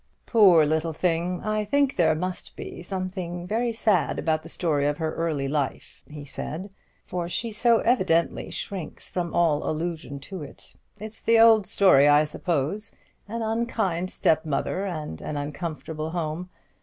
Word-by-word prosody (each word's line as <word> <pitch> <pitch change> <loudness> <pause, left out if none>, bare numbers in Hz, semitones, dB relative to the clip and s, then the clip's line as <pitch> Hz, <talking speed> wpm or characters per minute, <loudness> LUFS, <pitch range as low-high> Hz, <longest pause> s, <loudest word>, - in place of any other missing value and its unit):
"Poor 185 -9 +6
little 160 +2 0
thing! 175 +2 -1
I 215 0 0
think 280 +5 +1
there 160 -3 +3
must 180 +3 -5
be - - -8
something 180 -1 -4 0.3
sad 215 -5 +1
about 155 -1 0
the 165 - -8
story 150 -5 +1
of 145 0 0
her 160 -1 -2
early 155 -5 -1
life," 140 -1 -3
he 150 -1 -9
said; 180 +7 -6 0.3
"for 175 -1 -4
she 230 +5 -2
so 230 +2 +4
evidently 185 -9 +1
shrinks 185 -6 -5
from 175 -2 -3
all 165 -4 +2
allusion 160 -3 -4
to 185 +5 -7
it. 145 - -10 0.2
It's 215 +2 -8
the 230 0 +4
old 225 -3 +6
story, 180 -8 +5
I 145 +1 +6
suppose, 165 +6 -2 0.3
an 230 +2 -3
unkind 220 -6 -1
step 160 -3 +2
mother 165 +6 -2
and 155 - -5
an 150 - -4
uncomfortable 155 +1 -4
home. 170 +1 -3
170 Hz, 155 wpm, -25 LUFS, 155-195 Hz, 0.3 s, Poor